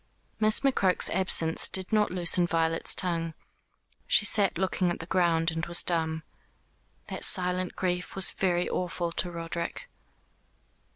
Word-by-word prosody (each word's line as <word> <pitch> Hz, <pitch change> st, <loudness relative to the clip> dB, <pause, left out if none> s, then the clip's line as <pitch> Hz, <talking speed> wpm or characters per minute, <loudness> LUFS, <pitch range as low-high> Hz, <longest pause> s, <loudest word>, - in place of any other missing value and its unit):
Miss 215 Hz, 0 st, +4 dB
McCroke's 225 Hz, -9 st, +2 dB
absence 170 Hz, -4 st, +2 dB
did 190 Hz, +2 st, 0 dB
not 210 Hz, -1 st, +2 dB
loosen 175 Hz, -1 st, 0 dB
Violet's 165 Hz, -1 st, 0 dB
tongue. 165 Hz, -3 st, -1 dB, 0.7 s
She 205 Hz, -, +3 dB
sat 200 Hz, -4 st, +2 dB
looking 185 Hz, 0 st, -1 dB
at 175 Hz, -, -4 dB
the 165 Hz, -, -9 dB
ground, 170 Hz, -2 st, 0 dB
and 165 Hz, 0 st, -5 dB
was 175 Hz, 0 st, +3 dB
dumb. 160 Hz, -2 st, -2 dB, 0.9 s
That -, -, -6 dB
silent 180 Hz, -1 st, +2 dB
grief 180 Hz, -1 st, -4 dB
was 190 Hz, -, +4 dB
very 180 Hz, -2 st, -2 dB
awful 175 Hz, -1 st, -4 dB
to 175 Hz, -, -3 dB
Roderick. 170 Hz, -, -6 dB
175 Hz, 135 wpm, -26 LUFS, 165-185 Hz, 0.9 s, Miss